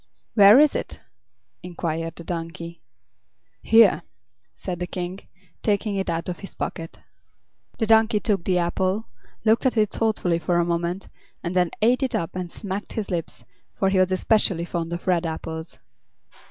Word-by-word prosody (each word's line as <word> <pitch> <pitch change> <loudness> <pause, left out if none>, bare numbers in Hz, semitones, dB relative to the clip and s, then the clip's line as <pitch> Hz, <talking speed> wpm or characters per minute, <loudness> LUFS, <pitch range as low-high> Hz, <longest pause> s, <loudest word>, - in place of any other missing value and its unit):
"Where 205 +3 +8
is 300 0 +5
it?" - - -4 0.6
inquired 165 -2 -4
the 170 - -9
donkey. 170 0 -6 0.8
"Here," 225 -5 +5 0.5
said 180 -2 -5
the 180 - -3
King, 180 +1 -5 0.4
taking 205 0 0
it 195 -2 -2
out 165 0 -2
of 180 -2 -4
his 195 - -10
pocket. 165 0 -5 0.8
The 225 - 0
donkey 220 0 +4
took 205 -5 0
the 185 0 +1
apple, 185 +4 0 0.4
looked 225 +4 +4
at 245 - -1
it 210 -2 +3
thoughtfully 200 -7 0
for 170 +1 0
a 170 - +2
moment, 170 +2 -2 0.4
and 175 0 -3
then 180 -2 +3
ate 245 +4 +4
it 265 - 0
up 165 - -3
and 180 -1 -4
smacked 200 0 -5
his 210 -3 -4
lips, 170 -2 -4 0.3
for 195 - +1
he 190 -1 +2
was 185 0 +3
especially 185 -3 +2
fond 170 -1 -3
of 170 0 -5
red 180 -2 +2
apples. 160 0 -6
185 Hz, 165 wpm, -24 LUFS, 170-210 Hz, 0.8 s, Where